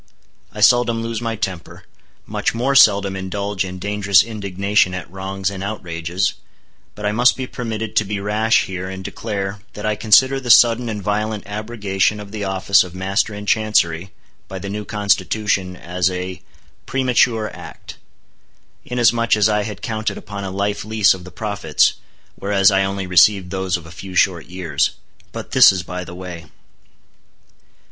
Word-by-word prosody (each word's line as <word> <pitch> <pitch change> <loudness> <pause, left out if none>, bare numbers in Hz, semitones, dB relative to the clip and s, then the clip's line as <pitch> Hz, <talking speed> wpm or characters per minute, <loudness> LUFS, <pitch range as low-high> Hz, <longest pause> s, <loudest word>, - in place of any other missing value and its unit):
I - - -8
seldom 120 -2 +4
lose 115 0 -4
my 115 -1 -2
temper; 95 -5 -6 0.4
much - - -2
more 125 +4 0
seldom 100 -7 +5
indulge 100 +1 -3
in 95 0 -7
dangerous 100 -1 +3
indignation 100 -3 0
at 90 -4 -6
wrongs 95 0 -3
and 95 -1 -6
outrages; 90 -2 -2 0.6
but 105 - -7
I 105 - +1
must 120 +4 +3
be 130 - -3
permitted 115 -3 -5
to - - +4
be 100 +1 -3
rash 105 +3 +2
here 95 -1 -5
and 95 0 -7
declare, 100 -1 -4
that 105 - -7
I 110 0 +1
consider 130 +6 +4
the 130 -2 -7
sudden 120 0 +5
and 105 -2 -5
violent 105 +1 -2
abrogation 105 -1 -1
of 100 -1 -10
the 105 -1 -5
office 95 0 +3
of 90 -1 -11
Master 95 +3 -1
in 105 0 -7
Chancery, 100 -5 +1 0.4
by 95 - -7
the 100 +1 -6
new 105 0 -5
Constitution, 100 -2 0
as 90 +1 -1
a—premature 110 +5 -2
act; - - -11 0.9
inasmuch 120 -2 +2
as 105 0 +4
I 105 -1 +1
had 105 -1 -7
counted 110 -1 -3
upon 100 -1 -7
a 95 - -4
life 100 +1 -2
lease 110 -1 +3
of 90 -1 -10
the - - -9
profits, - - +1 0.4
whereas 100 0 +2
I 95 0 +3
only 95 0 -3
received 90 +1 +4
those 95 -2 -1
of 85 - -13
a 80 - -12
few 95 +2 -9
short 90 -3 +2
years. 85 -5 -1 0.4
But - - -8
this - - +8
is 95 -2 -3
by 90 +1 -6
the 85 - -10
way. 90 -2 -8
100 Hz, 165 wpm, -19 LUFS, 95-110 Hz, 0.9 s, this